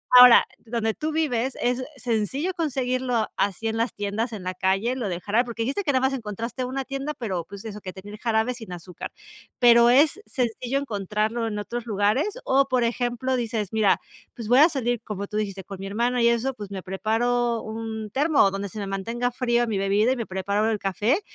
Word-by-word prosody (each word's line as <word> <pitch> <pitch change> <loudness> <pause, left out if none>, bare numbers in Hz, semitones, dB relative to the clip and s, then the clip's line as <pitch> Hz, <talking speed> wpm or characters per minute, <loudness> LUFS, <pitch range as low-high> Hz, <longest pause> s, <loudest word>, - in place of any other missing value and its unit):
ahora 250 -1 +10
donde 225 -1 -2
tú 310 +1 -3
vives 265 -5 0
es 250 +1 0
sencillo 255 - -1
conseguirlo 255 -7 0
así 200 +3 -1
en 220 - -1
las 230 +1 -1
tiendas, 205 +4 -2
en 205 -4 -6
la 185 - -3
calle, 195 +7 +1
lo 230 -6 -2
del 175 0 -4
jarabe 220 +4 +2
porque 230 -2 -4
dijiste 275 - -1
que 290 - +1
nada 260 -2 +2
más 270 - -3
encontraste 230 +1 -4
una 265 +1 -3
tienda, 275 +2 -4
pero 185 -8 -3
pues 200 +1 -9
eso 210 -2 -7
que 185 - -7
tener 205 +2 -10
jarabe 225 +1 +1
sin 225 -6 -10
azúcar. 175 +1 -8 0.5
Pero, 235 -1 +7
¿es 295 +10 +4
sencillo 250 +1 -1
encontrarlo 215 -1 -2
en 210 -1 -3
otros 240 +3 -4
lugares?, 220 - +1
o, 270 +1 +3
por 255 -2 +1
ejemplo, 245 +2 -1
dices: 225 -5 -2
"Mira, 210 -3 +4 0.4
pues 230 -3 -6
voy 250 +3 +5
a 315 +4 +8
salir", 245 -5 -1
como 200 -3 -4
tú 210 - -4
dijiste: 195 -2 -3
"Con 195 +1 -9
mi 195 - -5
hermana 240 +4 0
y 235 - +5
eso, 235 +3 0
pues, 205 -5 -8
me 190 -2 -5
preparo 230 +4 0
un 220 -1 -5
termo 290 +1 +3
o 195 - +3
donde 195 0 -4
se 215 - -10
me 200 - -3
mantenga 230 +6 -2
fría 240 -1 +1
mi 215 -4 -1
bebida 205 +5 +2
y - - +1
me 230 -3 -4
preparo 200 +3 0
el 220 - 0
café 210 - +1
230 Hz, 210 wpm, -25 LUFS, 205-250 Hz, 0.5 s, ahora